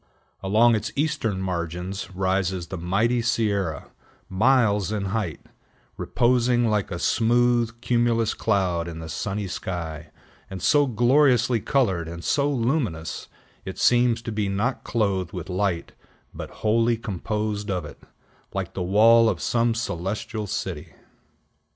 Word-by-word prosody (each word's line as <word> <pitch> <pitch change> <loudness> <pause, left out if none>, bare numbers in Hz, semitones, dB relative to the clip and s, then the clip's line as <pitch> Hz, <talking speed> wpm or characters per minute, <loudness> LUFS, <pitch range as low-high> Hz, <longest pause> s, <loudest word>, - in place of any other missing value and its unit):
Along 110 +5 +4
its 110 - -1
eastern 140 -9 -1
margin 90 0 -3 0.2
rises 95 -1 0
the 95 - -5
mighty 110 +8 +1
Sierra, 100 - -1 0.4
miles 105 -1 +2
in 105 -2 -2
height, 100 -9 -2 0.5
reposing 120 0 +2
like 105 -2 0
a 85 - -4
smooth, 120 +2 +2
cumulous 120 -2 +1
cloud 90 -6 0
in 85 -1 -7
the 80 -1 -7
sunny 100 +5 -3
sky, 85 -4 -5 0.4
and 95 - -6
so 145 - +3
gloriously 125 0 +3
colored, 95 - 0
and 85 0 -7
so 145 -1 +1
luminous, 115 - -2 0.4
it - - -7
seems 120 -1 +3
to 115 - -4
be 105 -2 -1
not 110 +7 -1
clothed 95 -6 -1
with 90 -1 -6
light, 90 -2 -1 0.4
but - - -7 0.2
wholly 115 +2 +3
composed 105 0 -3
of 90 -4 -2
it, 75 - -11 0.6
like - - -3
the 95 - -4
wall 110 +5 +5
of - - -2
some 115 -1 +1
celestial 105 +1 -3
city. 95 -6 -5
105 Hz, 130 wpm, -24 LUFS, 95-120 Hz, 0.6 s, wall